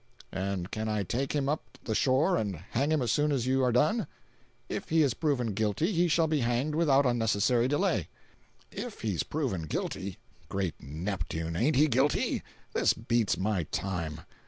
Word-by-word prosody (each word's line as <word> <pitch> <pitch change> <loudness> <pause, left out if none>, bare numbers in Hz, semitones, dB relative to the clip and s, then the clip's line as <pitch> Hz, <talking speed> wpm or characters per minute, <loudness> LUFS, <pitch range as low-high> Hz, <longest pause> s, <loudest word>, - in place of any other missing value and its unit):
"And 95 -1 -3
can 110 0 -2
I 105 -1 0
take 130 +9 -2
him 140 -2 0
up 150 +2 -3
the 110 - -2
shore 135 - +3
and 100 - -1 0.2
hang 140 +6 +1
him 155 -4 +2
as 115 - +1
soon 150 +3 +2
as 130 -4 0
you 130 +1 +2
are 125 - +3
done?" 150 - +2 0.6
"If - - -4
he 160 -1 +4
is 135 -5 +2
proven 125 -7 0
guilty 110 - 0
he 175 -2 +3
shall 165 0 +3
be 155 -1 +1
hanged 120 +5 0
without 145 -4 +4
unnecessary 120 0 +2
delay." 165 +8 +1 0.6
"If 245 -4 -6
he's 100 -7 0
proven 120 - -2
guilty. 95 +4 -3 0.3
Great 95 -5 -2
Neptune, 80 +1 -4
ain't 130 - +2
he 150 +4 +5
guilty? 135 +2 +1 0.3
This - - +3
beats 115 -1 0
my 95 -3 0
time. 85 -4 -3
120 Hz, 175 wpm, -29 LUFS, 100-145 Hz, 0.6 s, he